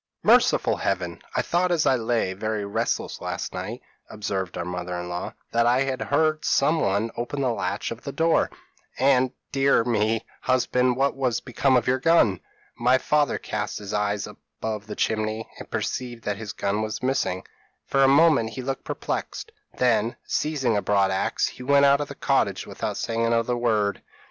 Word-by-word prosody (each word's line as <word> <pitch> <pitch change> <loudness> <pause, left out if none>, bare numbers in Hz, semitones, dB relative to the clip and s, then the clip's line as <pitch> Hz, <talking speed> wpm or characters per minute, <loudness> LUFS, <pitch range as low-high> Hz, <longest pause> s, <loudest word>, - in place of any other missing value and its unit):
p> - - +1
"'Merciful - - +4
Heaven! 90 -3 -2
I 125 - +2
thought, 180 +5 +1
as 165 -3 +2
lay 115 -6 +1
very 105 +1 -3
restless 100 - -2
last - - -4
night,' - - -5 0.3
observed 95 -4 -3
our 85 - -3
mother 90 0 -4
in 90 0 -6
law, 90 0 -4 0.2
'that 115 0 +3
I 125 +3 +3 0.2
heard 155 +1 +1
somebody 115 -8 +2
open 120 +4 -3
the 130 -2 +1
latch 100 -1 -3
of 115 +1 -6
the 140 - -5
door; 165 +2 +2 0.5
and, 130 -1 +3 0.2
dear 135 -3 +3
me, 110 -1 0 0.2
husband, 125 -1 +2
what 135 +2 +1
has 130 -4 0
become 130 +1 +1
of 120 - 0
your 130 +1 +2
gun?' 130 - +4 0.4
"My 125 +2 +3
father 150 +2 +1
cast 105 -1 -4
his 105 -1 -7
eyes 105 -1 0
up - - -12 0.2
above 110 -2 -4
the - - -6
chimney, 110 0 -1
and - - -9
perceived 120 -2 -3
that 105 -1 -2
his 110 -1 -6
gun 100 +2 -1
was 110 +2 -4
missing. 130 -8 0 0.4
For 135 0 +2
a - - +6
moment 140 -5 +5
he 130 - -5
looked 135 +1 -3
perplexed; 450 - -4 0.3
then, 115 -2 +2
seizing 145 -7 0
a 100 - +1
broad 100 -2 +2
axe, 95 - 0
he - - -9
went 140 +2 +4
out 140 +1 +5
of 145 - -3
the - - -9
cottage - - 0
without - - -4
saying 115 0 -1
another 115 +1 +1
word. 110 -4 0
115 Hz, 180 wpm, -25 LUFS, 105-135 Hz, 0.5 s, a